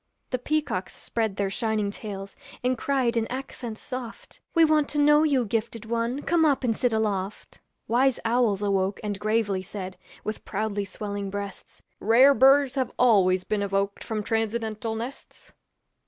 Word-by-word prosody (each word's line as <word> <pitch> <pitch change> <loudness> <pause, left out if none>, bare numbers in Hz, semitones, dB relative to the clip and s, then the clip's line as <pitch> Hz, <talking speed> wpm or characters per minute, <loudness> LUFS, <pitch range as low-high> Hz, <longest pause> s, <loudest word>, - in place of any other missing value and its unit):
The 255 - 0
peacocks 285 -10 -2
spread 220 -4 -2
their 195 -1 -1
shining 215 -1 -1
tails, 200 -2 -7 0.3
And 255 +1 +2
cried 255 -1 0
in 225 -1 +1
accents 250 -3 -6
soft, 250 -3 -7 0.2
'We 330 -1 +7
want 305 -2 +2
to 295 - -1
know 295 +1 +6
you, 280 -6 +2
gifted 225 +1 -3
one, 235 +4 -1
Come 335 -1 +2
up 285 -4 +3
and 230 -3 +1
sit 245 +1 +1
aloft.' 210 -2 -2 0.3
Wise 255 +3 +3
owls 225 -4 +2
awoke 195 -1 0
and 205 -2 -3
gravely 215 -3 0
said, 185 0 -7 0.3
With 215 0 -4
proudly 205 0 -2
swelling 200 0 -5
breasts, 200 0 -7 0.2
'Rare 250 +6 +6
birds 270 0 +5
have 260 -3 -1
always 190 -7 +4
been 210 +2 -1
evoked 200 0 -1
From 215 -2 -3
transcendental 225 0 -1
nests!' 240 +5 -8
225 Hz, 155 wpm, -26 LUFS, 200-255 Hz, 0.3 s, We